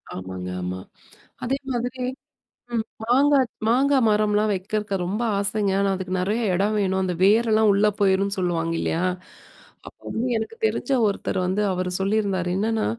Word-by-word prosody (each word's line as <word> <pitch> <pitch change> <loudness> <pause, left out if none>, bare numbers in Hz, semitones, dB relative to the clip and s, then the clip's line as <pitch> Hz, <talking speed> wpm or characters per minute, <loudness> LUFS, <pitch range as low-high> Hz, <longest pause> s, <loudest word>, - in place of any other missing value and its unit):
ஆமாங்க 95 0 -6
ஆமா. 90 +1 -4 0.6
அதே 270 +3 0 0.2
மாதிரி 245 +1 -3 0.7
ம் 225 - +1 0.2
மாங்காய் 270 +3 +4 0.2
மாங்காய் 265 +3 +3
மரம்லாம் 210 0 +2
வைக்கிறதுக்கு 205 +2 -2
ரொம்ப 200 +6 -2 0.2
ஆசைங்க, 200 0 0
ஆனா 200 0 +2
அதுக்கு 185 0 -5
நெறைய 210 +6 0
எடம் 200 +4 +1
வேணும். 190 -1 +1
அந்த 185 -1 -1
வேரெல்லாம் 220 +1 +4
உள்ளே 205 +2 +3
போயிரும்ணு 195 0 +2
சொல்லுவாங்க 165 -2 -1
இல்லையா? 165 +2 -1 0.8
அப்ப - - -11
வந்து 235 +3 -2
எனக்கு 220 - -5
தெரிஞ்ச 375 - -1 0.2
ஒருத்தர் 200 -1 -2
வந்து 190 +3 0
அவரு 185 0 -2
சொல்லியிருந்தாரு 195 -2 0
என்னன்னா, 220 +2 0
205 Hz, 145 wpm, -23 LUFS, 185-220 Hz, 0.8 s, மாங்காய்